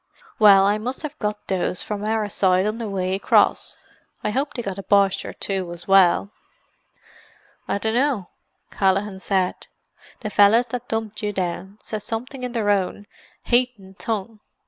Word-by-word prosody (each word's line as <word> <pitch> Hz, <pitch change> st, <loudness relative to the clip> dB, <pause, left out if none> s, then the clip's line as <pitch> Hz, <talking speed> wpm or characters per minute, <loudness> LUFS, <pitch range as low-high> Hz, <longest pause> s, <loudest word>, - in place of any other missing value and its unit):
Well 200 Hz, -3 st, +7 dB
I 205 Hz, +2 st, +2 dB
must 250 Hz, +7 st, -5 dB
have 300 Hz, 0 st, -6 dB
got 210 Hz, -1 st, -3 dB
those 185 Hz, -1 st, -1 dB
from 205 Hz, -1 st, -4 dB
our 215 Hz, 0 st, 0 dB
side 185 Hz, -1 st, +2 dB
on 215 Hz, +2 st, -2 dB
the 225 Hz, -3 st, -4 dB
way 185 Hz, -1 st, -1 dB
across. 195 Hz, -, +2 dB, 0.5 s
I 210 Hz, -, 0 dB
hope 275 Hz, +6 st, -2 dB
they 240 Hz, -, -3 dB
got 195 Hz, -1 st, -5 dB
a -, -, -3 dB
Boche 195 Hz, -1 st, +2 dB
or -, -, -6 dB
two 190 Hz, -3 st, -3 dB
as 175 Hz, 0 st, -12 dB
well." 195 Hz, 0 st, +4 dB, 1.4 s
"I -, -, 0 dB
dunno," 225 Hz, -1 st, 0 dB, 0.4 s
Callaghan 195 Hz, 0 st, 0 dB
said. 190 Hz, -2 st, -1 dB, 0.5 s
"The 215 Hz, -3 st, -4 dB
fellas 205 Hz, +5 st, +5 dB
that 245 Hz, +1 st, -5 dB
dumped 225 Hz, -1 st, -3 dB
you 210 Hz, -1 st, -1 dB
down 190 Hz, +2 st, -4 dB
said 215 Hz, -1 st, -5 dB
something 250 Hz, +5 st, -6 dB
in 250 Hz, -1 st, -4 dB
their 215 Hz, -4 st, +1 dB
own 200 Hz, +1 st, -1 dB, 0.4 s
haythin 240 Hz, -6 st, 0 dB
tongue. 220 Hz, 0 st, -4 dB
205 Hz, 165 wpm, -22 LUFS, 195-225 Hz, 1.4 s, Well